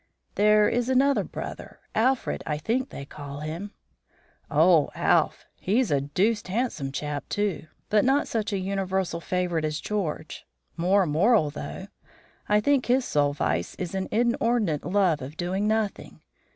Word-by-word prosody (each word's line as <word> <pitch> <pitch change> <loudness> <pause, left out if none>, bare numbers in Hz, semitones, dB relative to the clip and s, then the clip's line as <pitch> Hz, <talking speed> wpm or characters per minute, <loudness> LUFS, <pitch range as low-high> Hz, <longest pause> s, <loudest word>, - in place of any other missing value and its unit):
"There 210 0 +4
is 245 +1 0
another 270 +2 +3
brother - - -8
Alfred, 255 +3 +1
I 150 - -1
think 240 - -1
they 140 - -8
call 145 0 -8
him." 165 +7 -5 0.8
"Oh, 160 0 +4
Alph! - - +2
He's 220 +3 +1
a 140 -1 +2
deuced 195 +10 0
handsome 185 - -2
chap, 145 +1 -4
too, 205 -6 -1 0.2
but 210 -1 +4
not 270 +3 +2
such 220 -2 -2
a 200 - 0
universal 190 -2 -2
favourite 175 -2 -1
as 155 0 -2
George. 170 -7 -4 0.3
More 185 +3 +3
moral 165 +1 +3
though. 170 +5 -7 0.6
I 210 0 +5
think 275 +3 +2
his 250 +1 +3
sole 145 -6 +1
vice 85 -10 -1
is 180 -1 -5
an 190 -1 -2
inordinate 230 -7 +1
love 180 -5 +2
of 140 +5 -8
doing 185 +4 -1
nothing. 215 -2 -2
190 Hz, 150 wpm, -26 LUFS, 155-220 Hz, 0.8 s, I